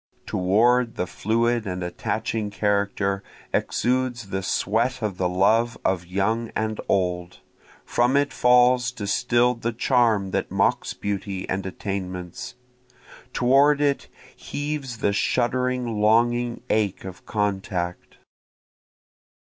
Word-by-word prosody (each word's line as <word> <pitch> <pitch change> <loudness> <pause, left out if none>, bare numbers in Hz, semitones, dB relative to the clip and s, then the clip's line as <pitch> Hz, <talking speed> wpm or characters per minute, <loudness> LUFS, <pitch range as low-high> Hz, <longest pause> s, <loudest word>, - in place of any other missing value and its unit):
Toward 115 +6 +2
the 90 - -1
fluid 115 +4 0
and 90 -1 -3
attaching 110 +4 -2
character 100 -1 0 0.3
exudes 125 -3 0
the 95 0 -2
sweat 115 +6 0
of 100 -4 -2
the 90 -1 +1
love 110 +6 +2
of 90 -2 0
young 110 +5 0
and 110 0 -2
old, 90 -2 -1 0.4
From 125 +3 +2
it 145 0 +1
falls 125 0 +4
distill'd 120 +2 +1
the 115 - 0
charm 115 -5 +2
that - - -1
mocks - - 0
beauty 100 -1 -4
and 95 0 -2
attainments, 95 +4 -5 0.8
Toward 140 +4 +4
it 145 -1 +1 0.3
heaves 145 -4 -4
the 100 - 0
shuddering 125 0 0
longing 120 +2 +2
ache 105 -4 0
of 95 -1 -10
contact. 95 -4 -2
110 Hz, 110 wpm, -24 LUFS, 95-125 Hz, 0.8 s, falls